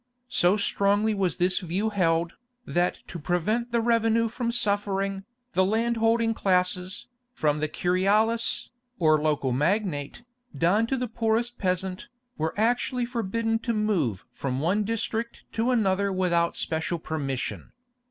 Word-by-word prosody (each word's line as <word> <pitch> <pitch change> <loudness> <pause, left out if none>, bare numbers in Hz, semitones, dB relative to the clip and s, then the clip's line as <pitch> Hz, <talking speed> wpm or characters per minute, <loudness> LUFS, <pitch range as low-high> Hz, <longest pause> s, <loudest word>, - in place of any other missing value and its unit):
So 180 0 +3
strongly 205 +1 +2
was 190 -4 0
this 180 0 +2
view 190 +4 -1
held, 170 -4 +1 0.3
that 175 +1 0
to 175 - -7
prevent 215 +9 -1
the 235 0 +2
revenue 230 0 +2
from 235 +1 -2
suffering, 200 -3 0 0.3
the 185 - +3
land 225 +4 +1
holding 225 0 +2
classes, 180 -2 0 0.3
from 150 - +1
the 155 - 0
curialis, 205 +8 +1 0.3
or 155 -3 +3
local 150 -4 +1
magnate, 160 - -1 0.3
down 200 +7 +3
to 270 - 0
the 250 0 -2
poorest 230 +1 -1
peasant, 185 0 -2 0.3
were 160 +1 -2
actually 245 +2 +1
forbidden 230 -1 -1
to 235 0 -2
move 175 - 0
from 130 -1 -3
one 185 +8 +1
district 230 +1 -3
to 225 +2 0
another 200 -5 +2
without 175 -2 +1
special 160 +2 -1
permission. 140 -5 -4
200 Hz, 135 wpm, -26 LUFS, 175-225 Hz, 0.3 s, So